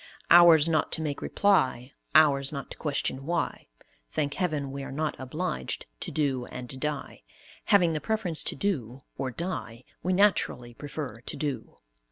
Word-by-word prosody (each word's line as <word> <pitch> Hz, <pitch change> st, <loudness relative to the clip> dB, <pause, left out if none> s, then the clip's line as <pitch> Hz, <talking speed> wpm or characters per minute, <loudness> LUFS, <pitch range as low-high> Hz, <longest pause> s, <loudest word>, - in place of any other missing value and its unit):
Ours 170 Hz, -2 st, +8 dB
not 160 Hz, -2 st, +1 dB
to 160 Hz, -, -1 dB
make 145 Hz, -2 st, -3 dB
reply, 130 Hz, -10 st, +2 dB, 0.2 s
ours 140 Hz, -3 st, +5 dB
not 140 Hz, -2 st, -6 dB
to -, -, -7 dB
question 140 Hz, -3 st, -1 dB
why. 170 Hz, +3 st, -2 dB, 0.4 s
Thank 145 Hz, -2 st, -1 dB
heaven, 150 Hz, -7 st, -1 dB
we 140 Hz, 0 st, -5 dB
are 135 Hz, -, -6 dB
not 150 Hz, +2 st, -2 dB
obliged 155 Hz, +8 st, -3 dB
to -, -, -5 dB
do 135 Hz, -5 st, 0 dB
and 125 Hz, +1 st, -7 dB
die; 150 Hz, -2 st, -3 dB, 0.4 s
having 180 Hz, -5 st, +4 dB
the 155 Hz, -, -2 dB
preference 215 Hz, -8 st, -1 dB
to -, -, 0 dB
do 135 Hz, -, -2 dB
or 135 Hz, -, -2 dB
die, 125 Hz, -7 st, -5 dB, 0.2 s
we 185 Hz, -, -1 dB
naturally 180 Hz, -11 st, +2 dB
prefer 145 Hz, -3 st, -6 dB
to -, -, -5 dB
do. 140 Hz, -7 st, -4 dB
145 Hz, 160 wpm, -28 LUFS, 130-170 Hz, 0.4 s, Ours